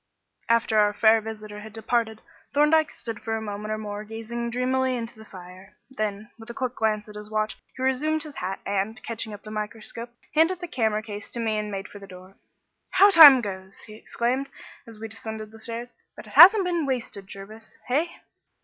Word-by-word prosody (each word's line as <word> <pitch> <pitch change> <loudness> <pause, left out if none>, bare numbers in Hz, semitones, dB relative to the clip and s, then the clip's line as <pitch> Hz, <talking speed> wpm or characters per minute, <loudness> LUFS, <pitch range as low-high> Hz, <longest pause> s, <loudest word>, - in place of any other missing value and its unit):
After 230 -2 +3
our 210 0 +3
fair 220 +1 +4
visitor 215 -1 -8
had 215 0 -11
departed, 225 -1 -1 0.3
Thorndyke 300 +1 +4
stood 230 -3 -6
for 225 0 -3
a - - -2
minute 210 -1 -6
or 215 - -1
more 210 -1 -6
gazing 225 +2 -5
dreamily 255 +1 0
into 230 -1 -7
the 220 - -12
fire. 185 +1 -13
Then, 215 -2 -4
with 225 +1 -12
a 235 - -7
quick 255 -2 -2
glance 215 -2 -1
at 210 - -11
his 210 0 -9
watch, 215 0 -1 0.2
he 260 - -4
resumed 300 +4 +1
his 300 -2 -10
hat 190 +1 -4
and, 200 +4 -2
catching 225 -1 -4
up 205 -1 -10
the 215 - -9
microscope, 215 +2 -5 0.2
handed 325 +4 +3
the 350 - -6
camera 220 -7 0
case 210 -2 -8
to 235 - -6
me 220 -2 0
and 210 0 -4
made 195 -1 -5
for 205 - -12
the 195 - -12
door. 185 +1 -14 0.5
"How 400 - +6
the 335 - +2
time 280 -5 +11
goes!" 190 -2 -8
he 215 - -13
exclaimed, 245 +5 -2 0.4
as 225 -2 -11
we 225 - -6
descended 220 0 -7
the 225 - -14
stairs; 235 +2 -6 0.2
"but - - -11
it - - -14
hasn't 385 +2 +9
been 340 -4 -1
wasted, 235 -7 -4
Jervis, 210 +3 -11
hey?" 295 +7 +1
220 Hz, 205 wpm, -25 LUFS, 210-250 Hz, 0.5 s, time